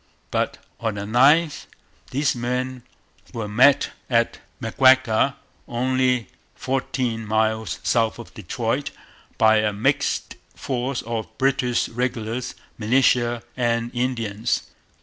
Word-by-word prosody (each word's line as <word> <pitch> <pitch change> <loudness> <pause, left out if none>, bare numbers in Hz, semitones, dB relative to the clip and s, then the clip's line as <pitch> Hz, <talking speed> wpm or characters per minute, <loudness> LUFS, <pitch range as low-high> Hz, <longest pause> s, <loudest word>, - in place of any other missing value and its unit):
But - - -1 0.2
on 110 -3 -2
the 100 - -4
9th 140 +9 +3 0.4
these 140 +1 +1
men 125 +1 -2 0.5
were 115 -3 -4
met 130 +7 +4 0.2
at 115 -2 +1 0.2
Maguaga, 130 +1 +4 0.3
only 125 -1 +1 0.3
fourteen 130 -3 -2
miles 110 +1 0
south 115 -2 +1
of - - -11
Detroit, - - -2 0.5
by 110 0 +5
a 110 0 +2
mixed 100 +1 0 0.2
force 130 -1 -3
of 115 -1 -3
British 130 -2 +1
regulars, 120 0 -3 0.2
militia, 120 0 +2
and 120 -1 0
Indians. 115 -4 -1
120 Hz, 105 wpm, -23 LUFS, 110-130 Hz, 0.5 s, by